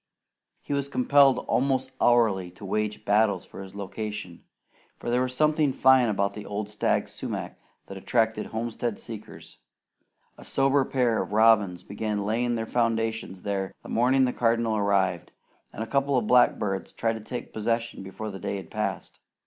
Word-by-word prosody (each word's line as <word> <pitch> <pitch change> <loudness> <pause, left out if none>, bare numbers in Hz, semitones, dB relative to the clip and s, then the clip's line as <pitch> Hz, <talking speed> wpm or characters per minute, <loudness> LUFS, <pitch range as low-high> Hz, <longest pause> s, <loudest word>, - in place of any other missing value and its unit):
He - - -4
was 140 0 -1
compelled 135 0 +4
almost 130 0 +1
hourly 110 -7 +3
to 100 - -11
wage 105 +2 -2
battles 100 -2 +2
for - - -10
his 95 0 -10
location, 105 -2 -6 0.5
for 120 - -4
there 125 +1 +2
was 130 0 -1
something 155 0 +3
fine 130 -2 +5
about 100 -1 0
the 105 - -7
old 105 0 -5
stag 105 - 0
sumac - - -6 0.3
that 95 0 -8
attracted 110 +1 0
homestead 115 0 -3
seekers. 110 -2 -9 0.8
A - - -11
sober 135 0 +2
pair 125 -4 +1
of - - -6
robins 105 -5 +4
began 105 0 -3
laying 120 +3 0
their 110 -1 -2
foundations 115 -5 -1
there 100 -2 -3
the - - -11
morning 130 +3 +3
the 125 - -1
Cardinal 115 -1 +1
arrived, 95 -4 0 0.4
and 110 - -5
a - - -7
couple 140 +1 +1
of 120 - 0
blackbirds 105 -5 +2
tried 115 0 0
to 110 - -7
take 120 +2 -7
possession 115 +1 -2
before 100 +3 -6
the 95 - -8
day 100 - -3
had 95 - -10
passed. - - -4
110 Hz, 165 wpm, -26 LUFS, 100-125 Hz, 0.8 s, fine